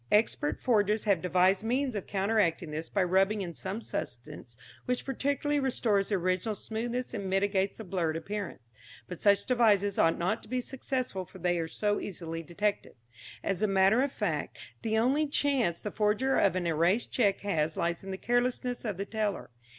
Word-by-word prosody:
Expert 230 +7 +2
forgers 215 -3 +2
have 200 -6 +2
devised 185 +2 +3
means 255 +3 0
of 200 - -4
counteracting 195 -5 +1
this 155 +2 -4
by 195 - +1
rubbing 195 +3 +2
in 175 -3 -4
some 190 +6 -5
substance 120 - -6 0.3
which 250 0 -1
partially 285 +2 0
restores 225 -7 +1
the 205 - +2
original 185 +3 0
smoothness 235 +5 -4
and 200 -4 -3
mitigates 195 0 +1
the 220 - -7
blurred 170 -4 -1
appearance. 195 - -5 0.4
But 180 - -8
such 200 -1 +4
devices 210 -5 +3
ought 165 - +4
not 185 +6 0
to - - -15
be 255 +1 0
successful 255 -5 -3
for 185 +1 -14
they 175 -1 0
are 165 - -2
so 205 +4 0
easily 165 -3 -5
detected. 200 +5 -2 0.5
As 195 0 -1
a 215 - +3
matter 195 +4 +4
of 275 0 0
fact 165 - -2 0.2
the 220 0 0
only 270 +7 +2
chance 275 - +1
the 210 - -5
forger 215 +5 +1
of 195 - +3
an 185 -1 -1
erased 170 +7 +1
cheque 205 -6 +2
has 160 -6 -1
lies 170 +1 -1
in 195 - -8
the 190 - -3
carelessness 245 +2 0
of 210 -6 -3
the 200 - -3
teller. 210 - -2
200 Hz, 180 wpm, -30 LUFS, 180-230 Hz, 0.5 s, such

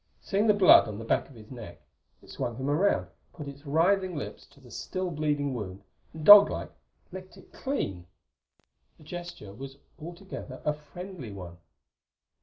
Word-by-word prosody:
Seeing 205 +3 0
the 210 - +5
blood 190 -11 +7
on 105 -1 -6
the 115 - -7
back - - 0
of 135 - -16
his 110 0 -14
neck, 120 -4 -10 0.4
it - - -14
swung 120 - -4
him 135 +4 -2
around, 190 +7 +2 0.3
put 150 -4 -8
its 140 +1 -10
writhing 180 +5 +2
lips 145 - -7
to - - -22
the 125 -3 -17
still 185 -1 -4
bleeding 145 -3 -1
wound 100 -5 -6 0.3
and 155 -1 -8
dog 205 0 +11
like - - -5 0.4
licked 185 0 -10
it - - -18
clean. 95 - -4 0.9
The - - -18
gesture 175 - -8
was 135 +4 -9 0.2
altogether 175 +4 -8
a 150 - +2
friendly 150 - -9
one. 90 -3 -10
150 Hz, 170 wpm, -28 LUFS, 120-185 Hz, 0.9 s, dog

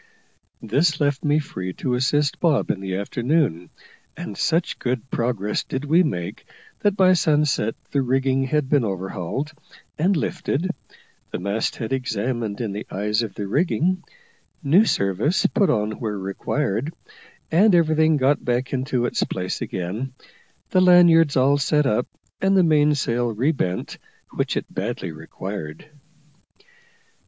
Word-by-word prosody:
This 145 +8 +1
left 145 -2 0
me 150 0 +3
free 95 -11 -4
to 125 - -2
assist 140 +4 +1
Bob 160 -6 +2
in 95 - -4
the 95 -1 -4
afternoon, 115 - 0 0.5
and 105 - -6
such 170 - 0
good 125 +1 -3
progress 115 -4 -1
did 135 +2 -4
we 160 +5 +4
make 90 - -3 0.3
that 205 -1 +1
by 185 -1 +6
sunset 150 -9 +1 0.2
the 140 - +1
rigging 135 +1 +1
had 150 +1 0
been 140 -2 +3
overhauled 95 - -3 0.5
and 180 +3 +2
lifted, 165 +3 -1 0.6
the - - -4
mast 100 +4 -2
head 115 +2 -4
examined 120 -3 -2
in 110 -4 -2
the 105 +2 -6
eyes 105 +3 0
of 110 -5 -5
the 105 - -4
rigging, 175 - +1 0.6
new 170 +10 +5
service 110 - +1
put 200 - +2
on 105 -2 +1
where 105 -3 -3
required, 100 +6 -2 0.6
and 190 +4 +5
everything 160 -2 +3
got 140 +2 +2
back 125 +2 -1
into 130 -2 0
its - - -1
place 90 -1 -4
again, 100 +9 -4 0.6
the 185 - +4
lanyards 170 -5 +6
all 140 +2 +4
set 150 +1 +2
up, 125 -1 +1 0.3
and 195 0 +3
the 185 - +5
mainsail 145 -7 +2
re 125 +8 +1
bent, 95 - -3 0.3
which - - -1
it - - -2
badly 95 -3 -3
required. 80 - -8
130 Hz, 145 wpm, -23 LUFS, 105-155 Hz, 0.6 s, by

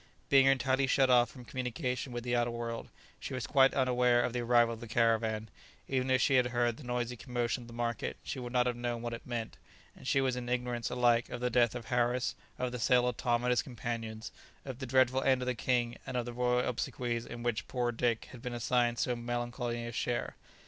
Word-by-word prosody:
Being 135 -1 +6
entirely 135 0 +3
shut 135 -1 +4
off 120 -1 +5
from 125 -1 -12
communication 125 +1 -3
with 120 -1 -4
the 120 0 0
outer 120 0 +2
world, 115 -1 -5 0.3
she - - -5
was 130 -4 -3
quite 135 -1 +4
unaware 125 -2 +3
of 120 - -1
the 125 - -1
arrival 120 -1 +3
of 115 - -8
the 120 - -8
caravan; 110 -1 +1 0.4
even 130 -1 0
if 130 0 +4
she 140 - +3
had 125 -1 +4
heard 120 -1 0
the - - -11
noisy 125 0 -2
commotion 120 +2 -2
of - - -14
the 120 - -11
market 120 0 -2
she 135 - -4
would 120 -1 -6
not 125 -1 +3
have 125 -1 0
known 120 -1 -3
what 120 0 -3
it 115 - -8
meant, 115 -2 -4 0.4
and - - -11
she 135 - +3
was 130 -2 +1
in 125 -1 -5
ignorance 125 -1 -1
alike 120 -1 +2
of 125 - -5
the 125 0 -1
death 120 0 +3
of 120 -2 -6
Harris, 125 +1 +1 0.2
of 125 -1 -2
the 125 - -5
sale 125 +2 +4
of 125 - -1
Tom 120 0 +1
and 125 - +2
his 125 - +3
companions, 115 -3 -5 0.3
of 130 -2 -6
the 130 - -5
dreadful 130 +1 +3
end 130 -2 +2
of - - -3
the 125 - 0
king, 120 0 0
and 125 - -3
of 120 - -1
the 120 - -6
royal 125 0 +1
obsequies 120 -1 -2
in 120 0 -7
which 120 -2 -1
poor 120 -2 -1
Dick 115 -1 0
had 125 - -11
been 125 0 -5
assigned 120 0 +1
so 125 - 0
melancholy 120 0 -3
a 115 - -5
share. 120 +1 -2
120 Hz, 235 wpm, -32 LUFS, 120-125 Hz, 0.4 s, Being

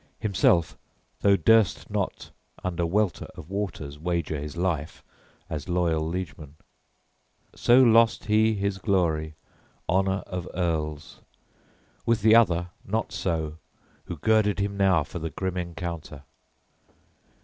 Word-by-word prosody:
Himself, 90 -4 +2 0.4
though, 100 -1 +4
durst 110 -5 +3
not - - -3 0.3
under 85 -2 -1
welter 100 +1 0
of 80 - -11
waters 80 -8 -4
wager 85 -2 -2
his 75 +2 -7
life 85 -4 -2 0.4
as 75 +3 -6
loyal 85 -3 +1
liegeman. 80 -4 -6 1.0
So 125 +2 +5
lost 115 -1 +4
he 110 +1 +3
his 100 -1 -2
glory, 80 -6 0 0.5
honor 95 +2 +1
of 90 -2 -5
earls. 80 -3 -3 0.8
With 115 -3 +1
the 110 0 +6
other 90 -7 +4
not 110 +3 -2
so, 80 -3 -2 0.5
who 85 - -6
girded 110 +2 +2
him 100 0 -1
now 95 -5 +3
for 85 - -7
the 80 0 -4
grim 95 +2 -4
encounter. 85 -4 -6
90 Hz, 120 wpm, -26 LUFS, 80-100 Hz, 1.0 s, the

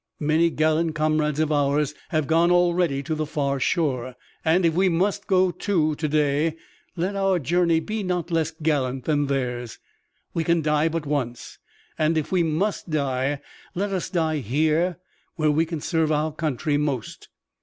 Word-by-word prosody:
Many 155 +3 +3
gallant 155 0 +1
comrades 155 -1 +1
of 155 -1 +1
ours 145 0 +1 0.2
have 155 -4 0
gone 165 +3 +3
already 175 -5 +2
to 160 +3 -3
the 155 -1 -2
far 140 -2 -1
shore, 130 -5 0 0.3
and 170 +2 +3
if 165 - +3
we 185 +3 +3
must 195 +4 0
go, 185 -1 +3
too, 165 -4 0
to 155 +1 -2
day, 150 +1 +1 0.4
let 185 +3 -2
our 195 -1 +2
journey 170 +2 +2
be 215 +6 -4
not 180 -2 -2
less 165 -2 +1
gallant 145 -5 -1
than 145 -2 +1
theirs. 125 -4 -3 0.6
We 165 - 0
can 170 0 +1
die 150 +1 +2
but 165 -1 -3
once, 130 -5 -3 0.4
and 160 +1 +2
if 155 - -2
we 185 -2 +3
must 170 +5 -1
die, 140 -2 -1 0.3
let 200 +3 -1
us 185 - -2
die 160 -4 0
here 155 - +1 0.4
where 155 -2 +2
we 160 +2 +1
can 165 -2 -4
serve 160 -2 0
our 155 +1 +1
country 150 -2 -1
most." 140 -6 -3
155 Hz, 170 wpm, -24 LUFS, 145-170 Hz, 0.6 s, Many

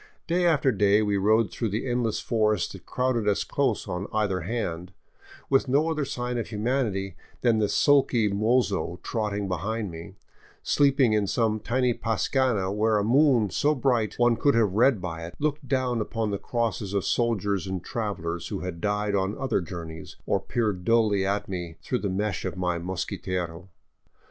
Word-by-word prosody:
Day 175 +1 +2
after 145 -5 +3
day 105 -1 +3
we 105 -1 0
rode 105 +1 +3
through 115 - -2
the 110 +6 -2
endless 120 -3 0
forest 110 -5 +1
that - - -12
crowded 125 -4 0
us 100 -1 +2
close 130 -8 -1
on 90 +1 -3
either 105 -4 0
hand, 90 -3 -4 0.5
with 135 0 +2
no 145 +5 +2
other 150 -3 -1
sign 125 -2 -3
of 115 - -3
humanity 105 -4 -1 0.3
than 115 -3 +3
the 105 -2 +1
sulky 135 -6 +3
mozo 105 -3 0
trotting 105 -3 -2
behind 100 +3 -3
me, 85 +4 -9 0.5
sleeping 140 -5 +3
in 105 -2 +1
some 110 0 +1
tiny 125 +2 +1
pascana 115 -3 0
where 110 +1 +2
a 105 - +1
moon 120 - +4
so 150 +1 +2
bright 120 -5 +1
one 120 -1 +4
could 140 +3 +3
have 110 -5 +2
read 115 -1 +3
by 85 -2 -5
it 85 +1 -8
looked 150 -1 -2
down 125 -3 0
upon 110 0 -2
the 100 - -2
crosses 110 -4 -2
of 100 -1 0
soldiers 100 -5 0
and 95 -2 -4
travelers 90 -7 -3
who 100 - -4
had 90 -2 -5
died 105 0 0
on 100 +1 0
other 135 -7 0
journeys, 80 -1 -8
or - - +1
peered 105 -6 -2
dully 110 -2 +3
in - - 0
at 100 +1 -1
me 85 -3 -5
through 125 - -1
the 100 - -2
mesh 100 +2 -2
of 95 -1 -4
my 90 -2 -1
mosquitero. 90 0 -4
105 Hz, 180 wpm, -26 LUFS, 95-120 Hz, 0.5 s, moon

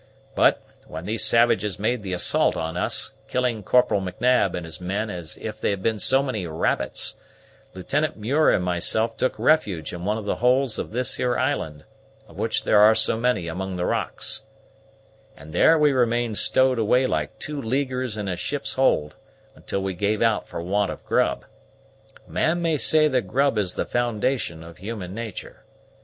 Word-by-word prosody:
But, - - +3 0.2
when 80 +3 -8
these 110 +1 +1
savages 110 -5 +3
made 110 +3 -1
the 95 -2 -6
assault 90 - +2
on 80 +2 -4
us, 90 - 0
killing 125 -3 -1
Corporal 125 -1 +2
M'Nab 95 +2 +1
and 90 - -5
his 80 +1 -8
men 100 +4 -2
as 85 -4 -4
if 110 0 -7
they - - +1
had 100 -2 -3
been 110 -2 0
so 135 +4 +3
many 110 -10 -3
rabbits, 80 0 0 0.6
Lieutenant 145 +11 -2
Muir 135 +9 +2
and 90 - +2
myself 110 +6 0
took 130 - -1
refuge 100 - +1
in 90 0 -7
one 105 +3 0
of 110 - -6
the - - -1
holes 125 -1 +2
of - - -4
this 125 +3 -1
here 125 -1 0
island, 80 - -2 0.4
of - - -14
which - - -1
there 105 - +4
are 110 +1 +7
so 110 - +3
many 115 -7 0
among 95 +3 -4
the 90 0 -2
rocks, - - -2 0.9
and 75 +1 -12
there 160 - +5
we 150 -1 +4
remained 120 -3 0
stowed 130 -2 +3
away 125 +4 +3
like - - -2
two 150 -1 -5
leaguers 130 -1 -2
in 105 -2 -4
a 90 - -2
ship's 135 +11 -3
hold, 75 - +1 0.4
until 100 - -4
we 95 -1 -2
gave 105 +4 0
out 115 -2 +1
for 85 - -6
want 100 +3 0
of - - -8
grub. - - 0 0.8
A - - -17
man 165 +2 +1
may 165 -2 0
say 155 +2 +4
that 125 -8 0
grub 135 +5 +1
is 100 -4 -1
the - - -2
foundation 120 -7 -1
of 85 -1 -12
human 100 -2 -6
nature. 115 -1 -7
110 Hz, 185 wpm, -23 LUFS, 95-125 Hz, 0.9 s, are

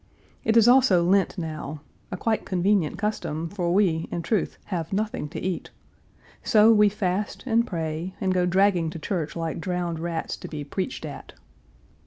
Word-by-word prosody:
It 225 +1 +3
is 230 0 +6
also 245 -9 +5
Lent 195 +3 +2
now 155 -3 -5 0.3
a 180 - -4
quite 220 +3 0
convenient 185 -2 +1
custom, 165 -7 -2
for 175 -3 -2
we, 175 -4 +2
in 170 - -3
truth, 215 +2 -1
have 170 -4 -4
nothing 210 -3 -2
to 165 - -6
eat. 185 -1 -3 0.7
So 215 +1 +5
we 210 -1 +5
fast 200 0 -2
and 235 -1 +2
pray, 165 +1 -4
and 190 -1 +1
go 180 -1 +2
dragging 185 -2 +3
to 165 - -7
church 165 0 -3
like 165 -1 -3
drowned 175 -2 -2
rats 165 -1 -3
to - - -8
be 150 -2 -5
preached 190 - -4
at. - - -9
180 Hz, 170 wpm, -25 LUFS, 165-210 Hz, 0.7 s, is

